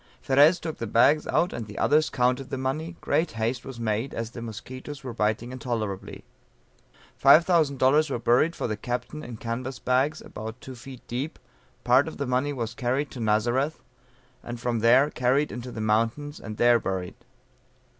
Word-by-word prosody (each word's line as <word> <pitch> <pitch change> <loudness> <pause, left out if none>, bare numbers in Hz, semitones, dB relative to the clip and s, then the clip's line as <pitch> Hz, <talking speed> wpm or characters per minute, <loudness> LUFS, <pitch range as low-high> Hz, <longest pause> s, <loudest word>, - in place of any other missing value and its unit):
Ferez 145 +6 +5
took 160 -2 -5
the 115 - -3
bags 140 +8 +4
out, 175 - +1
and 115 -2 -5
the 105 - -10
others 155 +2 +3
counted 125 +2 0
the - - -3
money; 155 +6 -3
great 160 +4 0
haste 115 +3 -2
was 130 -3 -9
made 115 +3 -2
as 115 0 -4
the 120 - -8
musquitoes 130 +5 -8
were 125 -2 -5
biting 110 +2 -1
intolerably. 115 -7 -4 1.0
$5000 150 -1 +5
were 135 - -1
buried 125 +8 +2
for - - -3
the 110 - -1
captain 120 +7 -4
in 120 -2 -8
canvas 125 +4 -4
bags 130 +4 +1
about 110 +3 -8
two 130 - -9
feet 130 +1 -12
deep, 130 +6 -4 0.5
part 130 +5 +4
of 160 - -7
the 140 - -2
money 130 +3 0
was 120 -4 -4
carried 130 +4 -1
to 130 - -8
Nazareth, 120 +7 0 0.6
and 120 0 -7
from 120 -1 -1
there 125 +6 +5
carried 130 +4 +1
into 125 +1 -6
the 115 - -7
mountains 115 +7 0
and 110 -1 -8
there 120 0 +5
buried. 95 -3 -3
125 Hz, 175 wpm, -26 LUFS, 115-140 Hz, 1.0 s, Ferez